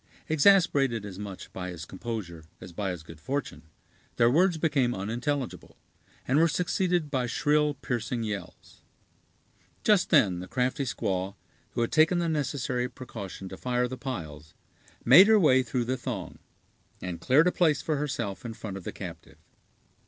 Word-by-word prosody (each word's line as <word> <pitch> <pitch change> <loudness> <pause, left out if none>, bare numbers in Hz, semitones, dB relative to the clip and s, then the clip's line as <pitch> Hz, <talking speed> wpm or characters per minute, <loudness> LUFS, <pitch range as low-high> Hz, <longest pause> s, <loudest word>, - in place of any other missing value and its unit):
Exasperated 145 - +4
as 95 -2 -8
much 100 -2 -8
by 90 -1 -5
his 85 -3 -7
composure 95 -6 -6 0.2
as 85 - -11
by 100 +2 -2
his 90 -3 -5
good 80 -1 -12
fortune, 140 - -4 0.5
their 115 0 +4
words 175 +4 +3
became 140 -6 +1
unintelligible, 120 +7 -3 0.5
and 135 +4 +3
were 165 - +5
succeeded 175 -1 0
by 130 -3 0
shrill, 150 +2 +1
piercing 120 -2 -3
yells. 100 -5 -7 1.0
Just 205 -4 +3
then 90 -3 +4
the 90 - -7
crafty 130 +4 -1
squaw, 95 -5 -2 0.4
who 120 - -1
had 115 - 0
taken 160 +3 +4
the 170 -1 0
necessary 130 -5 -1
precaution 105 -7 -8
to 95 - -8
fire 125 0 0
the 130 - -6
piles, 80 - -7 0.5
made 165 - +9
her 220 -1 +6
way 130 -7 +5
through 125 -2 -2
the 130 +2 -1
throng, 110 -10 -6 0.6
and 90 -2 -6
cleared 140 - +4
a 180 - +3
place 155 -8 +2
for 155 -2 0
herself 125 -8 -3
in 115 -2 -6
front 100 -3 -6
of 95 - -9
the - - -3
captive. - - -9
125 Hz, 160 wpm, -28 LUFS, 100-150 Hz, 1.0 s, made